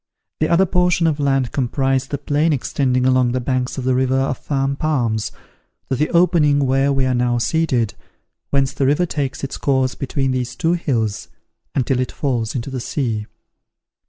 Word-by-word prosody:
The 155 - +1
other 180 +3 +4
portion 180 -1 +2
of 155 -2 +1
land 135 -3 +1
comprised 135 0 0
the 145 - -2
plain 150 +3 +1
extending 130 -1 0
along 130 -2 +3
the 130 - 0
banks 125 +1 -2
of 130 - -3
the 130 0 +2
river 130 +1 +1
of 135 -1 -1
Fan 135 -1 -1
Palms, 120 -8 -1 0.6
to - - +3
the 150 +4 0
opening 155 -5 +3
where 135 +2 +2
we 135 -1 +1
are 130 - +1
now 120 0 +1
seated, 125 -4 0 0.6
whence 135 -1 +1
the 135 - 0
river 150 +6 +2
takes 145 -6 -3
its 135 - -4
course 130 -2 +1
between 135 0 -2
these 125 -1 -2
two 165 +1 +1
hills, 115 - -1 0.5
until 130 -1 +1
it 130 - -1
falls 120 -5 -2
into 130 +2 -4
the 130 - -3
sea. 115 -6 -2
135 Hz, 180 wpm, -20 LUFS, 125-145 Hz, 0.6 s, other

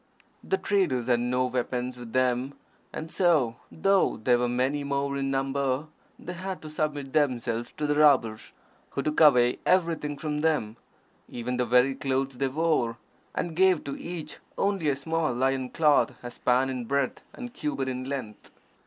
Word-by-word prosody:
The 385 - 0
traders 175 - +1
had 120 -1 +2
no 125 +1 +1
weapons 125 0 -2
with 120 -2 -10
them, 130 +2 +1 0.4
and 160 +1 -6
so, 150 -11 +2
though 195 +4 +2
they 120 +3 +3
were 120 0 +1
many 130 +4 0
more 140 0 -1
in 135 0 -1
number, 135 +1 0 0.3
they 180 - -7
had 185 +1 -5
to 155 - -8
submit 145 -3 -3
themselves 120 -5 0
to 150 - -3
the 145 - +2
robbers, 130 -8 +3 0.4
who 140 - -3
took 150 - 0
away 125 -5 +5
everything 165 -5 +1
from 150 0 -3
them, 145 -9 0 0.5
even 125 +1 -3
the 125 - +1
very 125 +3 +4
clothes 135 -1 -2
they 135 - +2
wore, 135 -5 0 0.4
and 165 -2 -2
gave 185 -2 +4
to 140 - -5
each 165 -3 -7 0.2
only 195 -6 +1
a 140 - +1
small 160 0 -1
loin 130 +1 0
cloth 150 -4 +3
a 120 - -6
span 130 +2 +1
in 125 -2 -4
breadth 140 +1 -1
and 245 -1 -7
a - - -23
cubit 145 - -3
in 130 0 -3
length. 130 -6 -6
135 Hz, 170 wpm, -27 LUFS, 125-155 Hz, 0.5 s, away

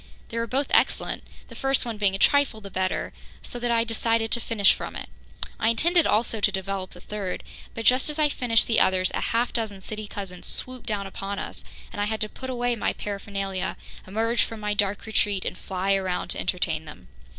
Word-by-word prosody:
They 230 - -2
were 230 - -1
both 270 +4 +1
excellent, - - +3 0.3
the - - -11
first 270 -1 +2
one 230 -3 -3
being 195 -2 +3
a - - -1
trifle 285 0 +3
the 200 -2 -9
better, 185 0 -1 0.3
so 245 - -5
that 240 0 -1
I 230 -1 +4
decided 225 0 +1
to 235 - +4
finish 220 -4 +4
from - - -6
it. - - -6 0.5
I 225 - +3
intended 335 +9 +4
also 220 +1 +2
to - - +3
develop 190 0 -3
the 180 - -12
third, 195 -1 -4 0.3
but 225 - -4
just 255 +6 +5
as 300 - -3
I 305 -1 +5
finished 240 -5 +2
the 225 - +3
others, 185 -1 +3
a - - -1
half 235 +2 +1
dozen 220 -4 -1
city 215 +2 -5
cousins 190 -3 -6
swooped 255 -1 0
down 205 -3 -1
upon 195 +1 -5
us - - -6 0.3
and 205 - -3
I - - +2
had 220 +1 -2
to 215 - 0
put 260 +4 -7
away 245 -1 0
my 225 - 0
paraphernalia, 195 -2 -3 0.3
emerge 225 +4 +1
from 225 - -5
my 210 0 -1
dark 205 -1 0
retreat 205 -3 +1
and - - -2
fly 190 +1 0
around 190 -2 0
to - - -2
entertain 165 -3 0
them. 150 - -11
215 Hz, 215 wpm, -26 LUFS, 195-235 Hz, 0.5 s, just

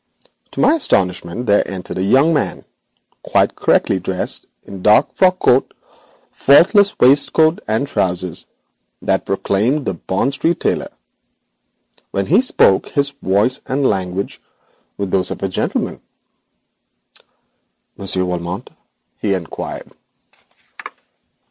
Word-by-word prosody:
To - - -7
my - - +5
astonishment 95 - -1
there 100 -2 +4
entered 95 -1 -6
a - - 0
young 135 +11 +3
man, 150 - -2 0.6
quite - - +1
correctly 95 - +1
dressed 90 0 -4 0.2
in 100 - -10
the - - -10
dark 105 +3 +3
frock 185 -1 +3
coat, 130 -6 +2 0.6
faultless 195 +8 +4
waistcoat 150 +5 +4
and 110 +6 0
trousers 90 - -2 0.6
that - - 0
proclaimed 110 +9 0
a 95 - 0
Bond 95 - -2
Street 165 +5 0
tailor. - - -1 1.2
When 100 +9 -2
he 165 - +4
spoke 100 - +3
his 140 0 0
voice 125 -1 0
and 135 +1 -1
language 95 -1 -3 0.6
were 100 - -2
those 95 -1 -1
of - - -6
a - - +1
gentleman. 95 - -3 1.9
'Monsieur 95 -1 -1
Valmont?' 90 0 -5 0.5
he 100 -2 0
inquired. 85 -3 -7
100 Hz, 115 wpm, -17 LUFS, 95-140 Hz, 1.9 s, my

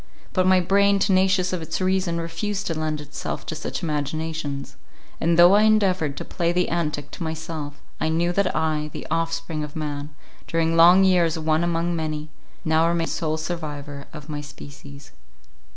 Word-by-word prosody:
But 185 -1 +2
my 185 0 +6
brain, 200 +2 +3
tenacious 190 -1 +2
of 180 - -2
its 160 +1 -4
reason, 185 -2 0
refused 195 +5 -3
to 165 - -1
lend 155 -1 -2
itself 150 0 -6
to - - -4
such 160 +3 -5
imaginations—and 155 +1 -3
though 175 +2 +8
I 205 - +6
endeavoured 190 -9 +2
to - - -5
play 170 -2 -1
the 180 0 +1
antic 150 -4 -2
to - - -10
myself, 160 -2 -5 0.2
I 160 - 0
knew 170 +2 +1
that 195 0 +1
I, 155 -1 0
the - - -6
offspring 165 -1 -2
of 150 -1 -8
man, 145 -2 -4 0.4
during 165 0 +1
long 175 +3 +7
years 175 -3 +3
one 160 +1 +1
among 170 0 0
many—now 155 +1 -2
remained 170 -1 0
sole 155 -1 -1
survivor 150 -4 -5
of 150 -2 -10
my 150 -2 -4
species. 145 -1 -12
165 Hz, 165 wpm, -23 LUFS, 155-175 Hz, 0.4 s, though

